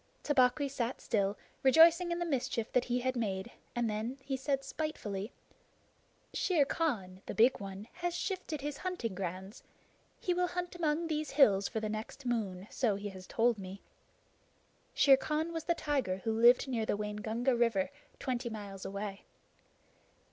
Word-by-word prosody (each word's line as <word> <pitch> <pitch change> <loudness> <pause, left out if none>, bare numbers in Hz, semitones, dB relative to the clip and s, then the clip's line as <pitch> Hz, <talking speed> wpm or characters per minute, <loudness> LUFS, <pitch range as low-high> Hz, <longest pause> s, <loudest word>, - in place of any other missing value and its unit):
Tabaqui 275 0 +3
sat 260 -2 -2
still, 200 -2 0 0.2
rejoicing 330 +6 +6
in 340 - 0
the 345 - -1
mischief 250 -6 -1
that 250 - +2
he 245 0 0
had 255 +1 0
made, 200 -2 -2 0.2
and 240 -1 +1
then 220 +5 -2
he 275 - -2
said 270 +1 -1
spitefully: 225 -9 -4 1.0
"Shere 335 -7 +3
Khan, 205 - -2
the - - -4
Big 235 +4 +5
One, 195 +1 -7
has 350 0 -2
shifted 350 -6 -3
his 290 0 -4
hunting 360 - -3
grounds. 190 +3 -5 0.6
He 360 - 0
will 360 0 +1
hunt 355 0 -3
among 325 -1 0
these 310 -2 -2
hills 205 -9 +5
for 220 - -3
the 215 - -2
next 215 +5 -6
moon, 205 -6 -2
so 225 -6 +1
he 205 +1 -4
has 185 -1 -10
told 230 -1 +2
me." 190 +1 -8 1.1
Shere 270 -2 +7
Khan 310 +4 -1
was 325 -1 -4
the 340 - +2
tiger 270 - 0
who 225 - 0
lived 240 +4 +6
near 230 -4 -1
the - - +1
Waingunga 220 +4 -1
River, 230 -2 +2 0.3
twenty 245 -2 -2
miles 200 -3 -7
away. 200 0 -5
240 Hz, 160 wpm, -33 LUFS, 210-295 Hz, 1.1 s, Shere